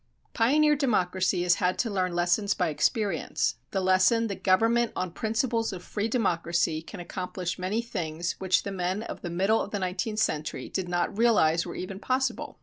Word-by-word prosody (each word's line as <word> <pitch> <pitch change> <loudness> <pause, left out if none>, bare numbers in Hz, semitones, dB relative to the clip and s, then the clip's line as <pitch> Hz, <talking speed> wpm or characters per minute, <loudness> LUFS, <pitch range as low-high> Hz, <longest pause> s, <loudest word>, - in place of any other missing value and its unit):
Pioneer 295 +6 +4
democracy 185 -9 +1
has 175 0 +4
had 180 0 +1
to 235 - 0
learn 185 -3 -1
lessons 180 +4 +1
by 180 -3 0
experience: 160 - 0
the 195 - -1
lesson 185 +5 +3
that 200 - -5
government 225 +5 +3
on 185 -1 -2
principles 225 +3 -1
of 180 -2 -7
free 210 +1 -2
democracy 170 -8 0
can 185 +4 -10
accomplish 180 0 -4
many 200 +6 -1
things 170 -7 -3
which 190 -1 +2
the 200 - -4
men 190 +2 -2
of - - -7
the 175 - -5
middle 195 +6 +2
of - - -4
the 205 - -3
nineteenth 190 +3 -2
century 155 -7 -1
did 185 -2 -3
not 175 +2 -1
realize 200 -8 +3
were - - -6
even 190 +1 -6
possible. 260 +4 -1
190 Hz, 180 wpm, -27 LUFS, 175-225 Hz, -, Pioneer